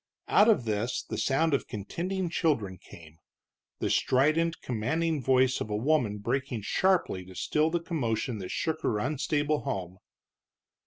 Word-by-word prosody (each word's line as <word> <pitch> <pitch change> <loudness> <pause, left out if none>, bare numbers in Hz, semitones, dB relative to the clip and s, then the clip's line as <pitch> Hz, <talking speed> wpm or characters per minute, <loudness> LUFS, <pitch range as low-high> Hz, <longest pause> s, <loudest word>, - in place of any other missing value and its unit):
Out 215 - +5
of 205 - +3
this 110 +3 -1
the - - -5
sound 155 +4 +2
of 140 - 0
contending 175 - -3
children 110 - 0
came, 80 -1 -15 0.6
the - - -1
strident, 155 +6 +2
commanding 145 +7 -1
voice 130 0 +3
of - - -3
a 105 - -1
woman 120 -3 +1
breaking 120 +1 -2
sharply 180 - +1
to 95 0 -13
still 155 - +1
the 170 +1 0
commotion 125 - -2
that 95 - -6
shook 160 -1 -2
her 110 - 0
unstable 145 +4 0
home. 95 -9 -4
130 Hz, 150 wpm, -29 LUFS, 105-160 Hz, 0.6 s, Out